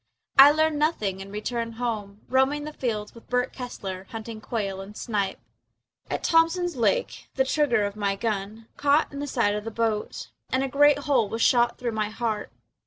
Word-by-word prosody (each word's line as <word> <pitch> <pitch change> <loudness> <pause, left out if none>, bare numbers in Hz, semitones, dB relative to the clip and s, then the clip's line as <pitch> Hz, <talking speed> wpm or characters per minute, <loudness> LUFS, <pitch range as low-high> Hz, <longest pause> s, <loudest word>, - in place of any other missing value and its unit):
I 275 +1 +12
learned 310 0 +2
nothing 210 - 0
and 195 +1 -9
returned 230 +2 -3
home, 215 -4 -4
Roaming 265 +3 +2
the 305 0 -6
fields 215 -6 -3
with 230 - -16
Bert 250 +1 0
Kessler, 195 -7 -6
Hunting 225 -1 -7
quail 200 -4 -3
and 205 +2 -10
snipe. 200 -4 -2 0.7
At - - -3
Thompson's 335 +1 +3
Lake 485 - 0
the 265 - +2
trigger 265 -6 +2
of 200 0 -4
my 200 -2 0
gun 215 +1 -3
Caught 290 +1 +2
in 280 - -5
the 290 - -3
side 230 -6 +1
of 210 0 -3
the 225 - -4
boat 225 -1 -2 0.2
And 260 +1 +1
a - - 0
great 290 +1 +5
hole 275 -7 +1
was 225 0 -1
shot 240 -1 +3
through 245 -1 -2
my 215 -1 -1
heart. 215 - -3
230 Hz, 185 wpm, -26 LUFS, 210-280 Hz, 0.7 s, I